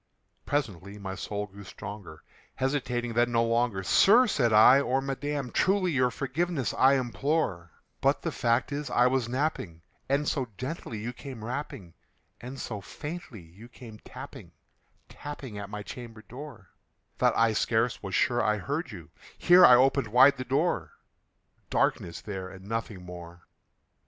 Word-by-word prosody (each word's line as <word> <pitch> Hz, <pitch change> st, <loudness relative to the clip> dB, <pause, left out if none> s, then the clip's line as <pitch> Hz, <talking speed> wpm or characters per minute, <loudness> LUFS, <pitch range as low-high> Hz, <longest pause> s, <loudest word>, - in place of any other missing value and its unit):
Presently 105 Hz, -, -3 dB
my 95 Hz, -2 st, -6 dB
soul 105 Hz, +1 st, -4 dB
grew 100 Hz, 0 st, -13 dB
stronger; 95 Hz, -5 st, -9 dB, 0.3 s
hesitating 125 Hz, -3 st, -2 dB
then 120 Hz, +1 st, +2 dB
no 115 Hz, 0 st, +2 dB
longer, 115 Hz, -4 st, 0 dB
"Sir," 225 Hz, -, +6 dB
said 130 Hz, -, +1 dB
I, 110 Hz, +5 st, +7 dB
"or 130 Hz, 0 st, 0 dB
Madam, 135 Hz, -1 st, -3 dB
truly 190 Hz, -, +2 dB
your 125 Hz, -4 st, +2 dB
forgiveness 140 Hz, +3 st, -2 dB
I 135 Hz, +1 st, +5 dB
implore; 130 Hz, -, -1 dB, 0.3 s
But -, -, +2 dB
the -, -, -1 dB
fact 120 Hz, +3 st, 0 dB
is 145 Hz, -1 st, -4 dB
I 120 Hz, -, +3 dB
was 125 Hz, -2 st, +1 dB
napping, 125 Hz, -, -3 dB, 0.3 s
and 140 Hz, +2 st, +1 dB
so 135 Hz, -4 st, -1 dB
gently 130 Hz, -3 st, -5 dB
you 115 Hz, +4 st, -5 dB
came 125 Hz, -3 st, -9 dB
rapping, 120 Hz, -, -6 dB, 0.5 s
And 130 Hz, +3 st, -8 dB
so 105 Hz, -4 st, -5 dB
faintly 145 Hz, -, -8 dB
you 90 Hz, +8 st, -15 dB
came 115 Hz, -4 st, -12 dB
tapping -, -, -11 dB, 0.5 s
tapping 135 Hz, -7 st, -8 dB
at 100 Hz, 0 st, -7 dB
my 105 Hz, 0 st, -6 dB
chamber 115 Hz, 0 st, -9 dB
door, 125 Hz, -, -11 dB, 0.5 s
That -, -, +3 dB
I 115 Hz, -1 st, +3 dB
scarce 115 Hz, +2 st, 0 dB
was 95 Hz, -2 st, -4 dB
sure 120 Hz, -1 st, +2 dB
I 105 Hz, 0 st, +1 dB
heard 145 Hz, -, -3 dB
you" 85 Hz, -7 st, -11 dB, 0.3 s
here 180 Hz, +1 st, +6 dB
I 125 Hz, -, +9 dB
opened 135 Hz, 0 st, +3 dB
wide 125 Hz, +6 st, +6 dB
the 130 Hz, -, -4 dB
door: 145 Hz, +7 st, 0 dB, 0.8 s
Darkness 85 Hz, -, 0 dB
there 95 Hz, -3 st, -6 dB
and 95 Hz, 0 st, -12 dB
nothing 110 Hz, -4 st, -4 dB
more. 85 Hz, -1 st, -11 dB
120 Hz, 155 wpm, -28 LUFS, 105-140 Hz, 0.8 s, I